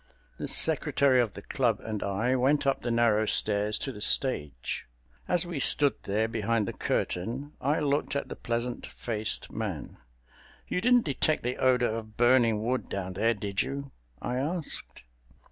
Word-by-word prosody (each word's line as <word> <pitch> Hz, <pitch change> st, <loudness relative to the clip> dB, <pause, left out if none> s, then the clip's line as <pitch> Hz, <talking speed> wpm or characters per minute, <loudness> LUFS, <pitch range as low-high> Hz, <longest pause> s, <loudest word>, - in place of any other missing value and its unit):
The -, -, -3 dB
Secretary 130 Hz, -3 st, +5 dB
of 115 Hz, -3 st, -2 dB
the 100 Hz, -, -9 dB
Club 120 Hz, -6 st, 0 dB
and 110 Hz, -2 st, -5 dB
I 110 Hz, +6 st, 0 dB
went 135 Hz, +4 st, +2 dB
up 135 Hz, 0 st, +1 dB
the 120 Hz, -, -3 dB
narrow 115 Hz, -2 st, +3 dB
stairs 105 Hz, 0 st, +2 dB
to 135 Hz, -, -3 dB
the 105 Hz, -, -10 dB
stage. 75 Hz, -, -1 dB, 0.4 s
As 180 Hz, -1 st, +1 dB
we 175 Hz, -4 st, -4 dB
stood 145 Hz, +1 st, +4 dB
there 105 Hz, +3 st, +1 dB
behind 115 Hz, -1 st, 0 dB
the -, -, -3 dB
curtain 120 Hz, +11 st, -2 dB
I 145 Hz, +4 st, +1 dB
looked 145 Hz, 0 st, 0 dB
at 140 Hz, -, -2 dB
the -, -, -6 dB
pleasant 120 Hz, +1 st, -3 dB
faced 110 Hz, -2 st, -4 dB
man. 105 Hz, -8 st, -5 dB, 0.7 s
"You 180 Hz, -, -1 dB
didn't 245 Hz, +2 st, +4 dB
detect 150 Hz, +1 st, 0 dB
the 125 Hz, +1 st, -2 dB
odor 125 Hz, -3 st, +2 dB
of 110 Hz, -1 st, -9 dB
burning 120 Hz, -3 st, +4 dB
wood 125 Hz, +2 st, -1 dB
down 95 Hz, -1 st, -4 dB
there, 115 Hz, +5 st, +1 dB
did 100 Hz, -1 st, -2 dB
you?" 140 Hz, +1 st, -5 dB, 0.3 s
I 125 Hz, -, -3 dB
asked. 155 Hz, -, -4 dB
120 Hz, 165 wpm, -28 LUFS, 105-135 Hz, 0.7 s, Secretary